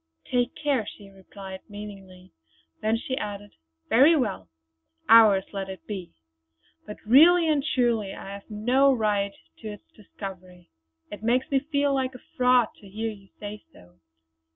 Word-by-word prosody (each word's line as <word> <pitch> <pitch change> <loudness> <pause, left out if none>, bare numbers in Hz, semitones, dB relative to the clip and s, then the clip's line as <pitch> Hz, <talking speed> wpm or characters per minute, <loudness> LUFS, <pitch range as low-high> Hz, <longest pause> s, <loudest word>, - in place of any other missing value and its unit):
"Take 245 0 0
care!" 280 -8 -1
she 200 -2 -11
replied, 190 0 -10
meaningly, 195 -3 -11 0.5
then 220 +1 +1
she 260 +3 -4
added: 205 -6 -6 0.4
"Very 280 +8 +6
well! 200 - -2 0.6
Ours 215 -4 +7
let 195 -1 -4
it 190 -2 -9
be. 190 -5 -6 0.8
But 210 - -7
really 325 +9 +6
and 300 -3 +2
truly 235 -8 0
I 195 - -8
have 200 +2 -11
no 250 +6 +3
right 205 -5 0 0.2
to 220 - -8
its 210 -1 -9
discovery; 185 -4 -11 0.4
it 205 - -8
makes 245 +5 0
me 275 - +3
feel 285 0 0
like 260 -1 -1
a - - -10 0.2
fraud 250 -2 +4
to 200 - -15
hear 220 +3 -3
you 200 -2 -14
say 210 0 -8
so." 90 0 -20
215 Hz, 155 wpm, -26 LUFS, 195-255 Hz, 0.8 s, Ours